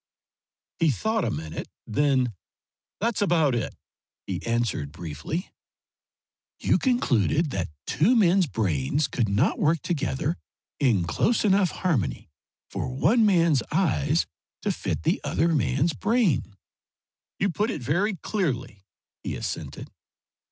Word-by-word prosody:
He 165 - +4
thought 220 - 0
a - - 0
minute. 80 +1 -5 0.2
Then, 130 -1 +1 0.7
"That's 230 +1 0
about 165 -8 +3
it," 120 -2 -2 0.5
he - - -4
answered 115 -11 -1
briefly. 85 - -5 1.1
"You - - +2
concluded 155 - +2
that 90 -6 -2 0.2
two 200 - +3
men's 190 -4 +4
brains 100 - 0
could 115 -4 -1
not 105 - +1
work 160 +1 +3
together 155 -1 -1 0.4
in 115 -10 +3
close 215 - +1
enough 195 -2 +4
harmony 115 - -1 0.4
for - - -3
one 215 - +3
man's 170 - +4
eyes 160 -2 +2 0.4
to - - +1
fit - - -3
the - - +1
other 170 - +1
man's 145 +2 +1
brain." 195 - +1 0.8
"You 200 -1 +1
put 210 +6 0
it 155 - -4
very 190 - +1
clearly," 125 - -3 0.3
he - - -4
assented. - - -5
150 Hz, 125 wpm, -26 LUFS, 115-190 Hz, 1.1 s, He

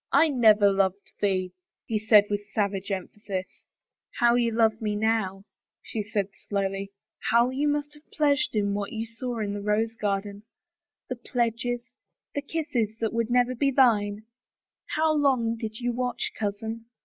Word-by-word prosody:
I 310 +3 +5
never 215 -6 +5
loved 195 0 0
thee," 185 -3 0 0.3
he 220 -2 -1
said 215 -1 +6
with 205 0 -3
savage 200 -2 0
emphasis. 190 0 -4 0.7
How 240 0 +5
you 240 -1 +3
love 220 -1 +2
me 210 -1 -1
now! 205 -3 0 0.2
" - - -66
she 220 - -3
said 205 -1 -2 0.2
slowly. 195 -1 -1 0.4
How 235 +2 +4
you 280 +3 0
must 295 0 -1
have 295 +1 -19
pleasured 290 -4 +1
in 200 -1 +1
what 200 0 -3
you 225 0 -3
saw 235 +2 -5
in 200 -1 -2
the 205 - -4
rose 215 +2 0
garden 200 -1 -2 0.3
— - - -65
the 255 - -3
pledges, 240 +1 -2 0.4
the 285 - -1
kisses 280 -8 -2
that 225 -1 -2
would 230 0 0
never 245 +1 +3
be 275 +3 +1
thine. 215 -6 +3 0.7
How 315 0 +3
long 260 -6 +2
did 220 -1 -6
you 245 0 0
watch, 250 0 -2
cousin? 220 +2 -4
225 Hz, 165 wpm, -27 LUFS, 205-245 Hz, 0.7 s, said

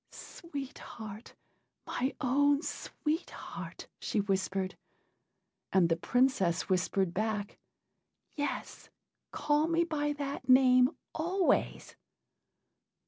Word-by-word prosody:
"Sweet 285 -6 -8
Heart! 215 0 -9 0.5
my 260 +2 -1
own 285 +3 +3
Sweet 315 0 -3
Heart!" - - -8
she 215 - -1
whispered. 195 -1 -1 1.0
And 180 -3 +4
the 165 - +3
Princess 195 -3 +2
whispered 185 -1 +1
back, 210 0 -2 0.8
"Yes, 290 -1 -4 0.4
call 300 +1 +1
me 335 0 +3
by 295 -3 -1
that 285 -2 -5
name 255 -1 +7 0.2
always." 355 +3 0
255 Hz, 90 wpm, -31 LUFS, 200-295 Hz, 1.0 s, name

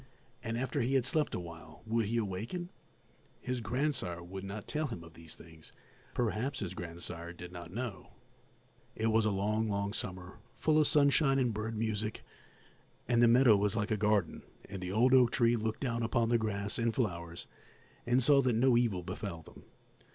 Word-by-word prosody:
And 115 -1 -2
after 130 +3 -1
he 130 +4 +1
had 130 -3 +3
slept 150 +3 +1
awhile 80 -2 -9
would 110 -1 0
he 115 +2 -1
awaken? 115 - -3 0.7
His 125 -1 -3
grandsire 115 - -1
would 95 +2 -7
not 100 +1 -6
tell 155 0 -1
him 90 -10 -7
of 85 -1 -13
these 80 -1 -10
things; 80 -1 -15 0.4
perhaps 125 +3 -1
his 95 -3 -4
grandsire 85 -1 -6
did 90 0 -9
not 85 -1 -9
know. 115 -1 -6 0.8
It 110 0 +1
was 110 0 +3
a - - +3
long, 105 +2 0
long 100 0 -1
summer, 90 -3 -5 0.2
full 155 -1 +3
of 150 - +4
sunshine 140 -2 +4
and 125 -4 +1
bird 110 +1 -3
music, 110 -1 -2 0.8
and 120 -1 +3
the 120 - +7
meadow 120 -1 +6
was 100 0 +1
like 105 0 -1
a - - +3
garden, 105 -3 +1 0.3
and 95 - -7
the 90 0 -4
old 120 +6 +4
oak 125 -2 +6
tree 120 -1 +3
looked 110 -1 -3
down 120 -3 -1
upon 115 0 +1
the 120 -1 +3
grass 100 -1 -2
and 115 -1 0
flowers 85 -8 -3 0.6
and 125 +2 +3
saw 140 +2 +6
that 125 -3 +1
no 125 +2 +4
evil 115 -7 +1
befell 90 -2 -6
them. - - -15
110 Hz, 185 wpm, -32 LUFS, 95-125 Hz, 0.8 s, the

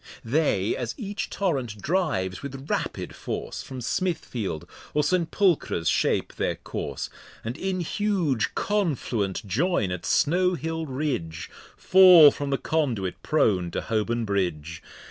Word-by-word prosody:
They, 115 -6 +1
as 120 -1 -4
each 205 -2 -4
Torrent 135 - -2
drives, 140 - -1
with 135 0 -7
rapid - - -2
Force - - -5
From 130 -2 -8
Smithfield, 120 - -2 0.3
or 150 - +3
St.Pulchre's 170 - +1
shape - - +1
their - - 0
Course, - - -5 0.3
And 115 +2 -3
in 185 +3 -2
huge 175 - 0
Confluent 130 - -1
join 110 - +1
at 90 -1 -4
Snow 180 +4 +3
Hill 160 +1 -3
Ridge, 125 - -3 0.3
Fall 180 -5 +8
from 145 0 -4
the 135 - +1
Conduit 120 - -1
prone 95 - +2
to - - -3
Holborn 115 +1 -1
Bridge. 85 -6 -2
140 Hz, 125 wpm, -26 LUFS, 105-170 Hz, 0.3 s, Fall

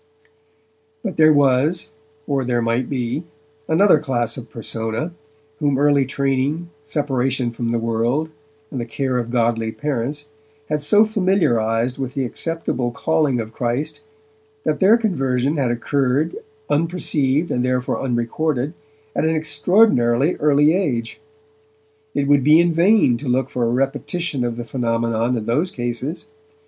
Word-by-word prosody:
But 200 -5 -3
there 155 0 +6
was, 145 +4 +2 0.3
or 140 -2 0
there 120 -1 0
might 115 +2 0
be, 125 +3 -2 0.4
another 165 0 +5
class 120 -6 -1
of 125 - -9
persona, 115 +7 -4 0.5
whom 145 -3 +1
early 140 -1 +3
training, 140 +5 -1
separation 135 -4 -1
from 115 0 -3
the 115 - 0
world, 115 +7 0 0.4
and 130 - -3
the 120 - -5
care 130 +1 -1
of 120 -1 -4
godly 115 -2 0
parents 145 +2 -3 0.4
had 150 -1 -1
so 205 +9 +5
early 220 - +3
familiarized 130 - +1
with 135 0 -4
the 135 -2 0
acceptable 130 -3 -2
calling 140 0 0
of 110 0 -5
Christ 125 - -3 0.6
that - - -1
their 205 +4 +6
conversion 140 - 0
had 135 -4 +1
occurred, 135 - 0 0.3
unperceived 155 -2 0
and 125 - 0
therefore 125 0 -1
unrecorded, 130 +3 -1 0.4
at - - 0
an 160 0 +1
extraordinarily 150 - +3
earl 145 -1 +2
age. 150 -8 +1 1.0
It 140 - 0
would 145 -2 +4
be 155 +4 +6
in 170 0 +3
vain 170 - +4
to 140 +1 -5
look 130 +1 0
for 120 -1 0
a - - +1
repetition 135 +3 -1
of 120 -1 -2
the 120 0 -6
phenomenon 115 0 -1
in 110 - -4
those 145 +11 +1
cases. 120 +6 -4
135 Hz, 145 wpm, -20 LUFS, 120-155 Hz, 1.0 s, there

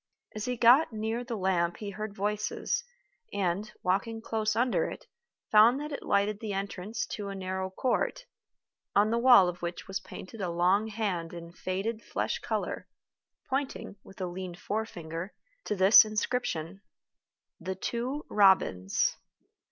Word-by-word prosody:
As 215 0 -4
he 250 -1 -2
got 245 +7 +6
near 220 +2 -2
the 240 -1 -4
lamp 180 -3 0
he 205 -2 -5
heard 210 0 -6
voices, 210 +1 -1 0.5
and, 195 +3 -1
walking 200 +5 0
close 220 -1 -1
under 245 +2 +1
it, - - -9 0.5
found 225 +5 +7
that 300 +1 -5
it 280 - -4
lighted 200 +1 +1
the 215 -2 -4
entrance 195 +2 -3
to 205 -2 -4
a 195 - -5
narrow 190 0 -3
court, 255 - -1 0.7
on 210 +2 +4
the 235 - +2
wall 240 -6 +7
of 175 0 -4
which 170 0 -5
was 195 -1 -3
painted 190 +3 -10
a 180 - -1
long 180 +5 +2
hand 200 -7 -2
in 170 0 -8
faded 195 +6 -3
flesh - - -2
color, - - -3 0.6
pointing, 270 -6 -3
with 195 - -15
a 185 - -1
lean 180 0 -6
forefinger, 175 -3 -5 0.3
to 210 - -1
this 195 +4 +8
inscription: 210 -5 -2 0.8
THE 190 +2 -4
TWO 245 +9 -3
ROBINS. 190 - +3
205 Hz, 150 wpm, -29 LUFS, 185-225 Hz, 0.8 s, this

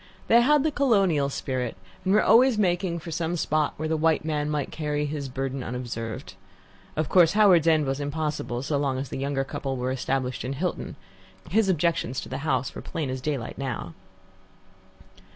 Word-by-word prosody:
They 235 +1 +6
had 290 +3 +4
the 315 - +1
colonial 195 - +2
spirit, 130 -4 -3 0.3
and 190 - +1
were 215 - +5
always 245 +1 +5
making 175 -3 +1
for 165 0 -7
some 165 +1 -1
spot 155 -2 0
where 155 - -2
the 160 - 0
white 160 0 +2
man 150 -1 -1
might 150 -2 -2
carry 150 -1 -2
his 145 -2 -4
burden 135 0 -3
unobserved. 120 -2 -5 0.6
Of 155 -1 0
course, 175 -1 +5
Howards 190 -6 +5
End 155 -2 +4
was 135 +1 -2
impossible, 145 -4 -3
so 145 0 0
long 135 -2 0
as 135 0 -4
the - - -5
younger 135 0 -1
couple 135 0 -4
were 125 +1 -1
established 130 -1 -2
in 130 - -3
Hilton. 175 +7 -3 0.6
His 215 -2 +3
objections 165 -7 +1
to - - -9
the 130 - -4
house 135 -4 -1
were - - -7
plain 150 -5 -4
as 130 0 -4
daylight 135 -5 -3
now. 125 -10 -4
150 Hz, 185 wpm, -26 LUFS, 135-170 Hz, 0.6 s, They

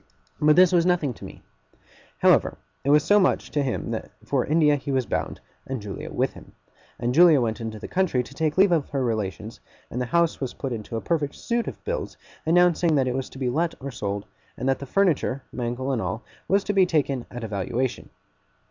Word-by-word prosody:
But 150 0 +5
this 180 -1 +6
was 175 -2 +4
nothing 170 -7 +1
to - - -11
me. - - -12 0.7
However, - - +3 0.3
it 140 - -1
was 150 0 +5
so 205 +4 +5
much 185 - +1
to 145 - +1
him 130 -3 -2
that 110 - -4 0.2
for 130 0 +1
India 150 -1 +3
he 140 0 -4
was 130 -2 +1
bound, - - -3 0.3
and 135 -2 -3
Julia 100 -2 -7
with - - 0
him; - - -14 0.4
and 120 +1 -1
Julia 165 -1 +7
went 115 -1 -1
into 110 -1 -5
the - - -7
country 180 -9 +1
to 140 - -13
take 155 +2 -1
leave 190 0 +5
of 160 -5 +1
her 135 -3 -1
relations; 110 -2 -3 0.3
and 125 - -3
the 125 - -2
house 170 +4 +1
was 130 - -3
put 135 -3 -4
into 115 0 -5
a - - -3
perfect 150 -4 -1
suit 235 -1 -2
of - - -7
bills, - - -4 0.3
announcing 170 -1 +4
that 135 -2 +2
it 125 - 0
was 130 0 -3
to - - -12
be 130 -1 -2
let 165 +5 0
or 140 +1 -6
sold, 100 -4 -4 0.3
and 130 - -3
that 135 - +2
the 140 - -7
furniture 150 -6 +1
(Mangle 125 +2 -3
and 125 - 0
all) 95 +5 -3 0.2
was 195 +1 +3
to 205 - -1
be 190 -2 +4
taken 140 -6 0
at 120 -1 -7
a - - -3
valuation. 110 +5 -2
135 Hz, 220 wpm, -25 LUFS, 120-165 Hz, 0.7 s, Julia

